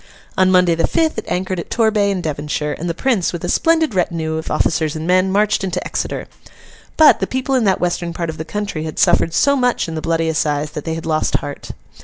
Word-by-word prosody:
On 185 0 +3
Monday, 180 -2 +4
the 165 - +1
fifth, 320 -7 0
it - - -8
anchored 185 +1 -2
at - - -7
Torbay 220 -3 +2
in 195 -2 -1
Devonshire, 150 -1 -3
and 170 +2 -3
the 165 - -2
Prince, 230 -5 0
with 175 - -5
a - - -3
splendid 325 -5 +2
retinue 165 -3 -1
of 160 - -5
officers 155 -2 0
and 155 0 -4
men, 185 +2 +2
marched 205 0 +1
into 190 - -2
Exeter. - - -3 0.7
But 315 -2 +7
the - - -1
people 260 +1 -2
in 255 -4 +2
that 190 -2 +2
western 175 -1 -1
part 170 -1 -3
of 155 - -12
the - - -2
country 200 -1 -4
had 155 - -6
suffered 165 - +3
so 280 0 +3
much 250 -7 +1
in 165 - -5
The 160 - -4
Bloody 165 0 0
Assize, 150 -2 -1
that 150 - -7
they 160 - -2
had 165 - -6
lost 155 -1 0
heart. 145 - -4
175 Hz, 235 wpm, -18 LUFS, 160-210 Hz, 0.7 s, But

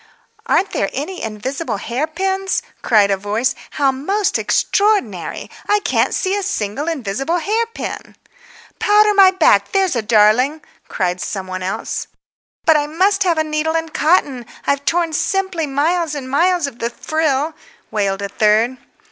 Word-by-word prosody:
"Aren't 390 - +2
there 195 - -1
any 315 +8 -4
invisible 225 +6 -4
hair 245 +9 -2
pins?" 385 +3 -1 0.2
cried 205 -3 +3
a 195 - +2
voice. 210 +6 -1 0.2
"How 280 -2 +1
most 385 +10 -1
extraordinary! 395 - 0 0.2
I 415 - +4
can't - - +1
see 380 +1 0
a 405 - -1
single 290 - -3
invisible 270 - -2
hair 435 +7 0
pin." 460 - -7 0.6
"Powder 420 0 +4
my 390 -2 +7
back, 315 - +3
there's 385 -6 +2
a 235 - +1
darling," 230 +8 +3 0.2
cried 180 -2 -2
some 195 -2 -4
one 185 0 -5
else. 185 - -3 0.6
"But 320 -2 +6
I 295 0 -1
must 385 +6 +1
have 340 -3 +2
a 315 - +2
needle 310 +1 -1
and 325 -1 -5
cotton. 280 -7 +1 0.2
I've 280 0 0
torn 335 -1 +1
simply 380 -2 -1
miles 310 +3 0
and 270 -3 -6
miles 340 +5 +2
of 270 -4 -7
the 235 - -1
frill," 310 +3 -1 0.4
wailed 200 -2 -1
a 200 - -3
third. 220 +5 +2
300 Hz, 155 wpm, -18 LUFS, 225-360 Hz, 0.6 s, my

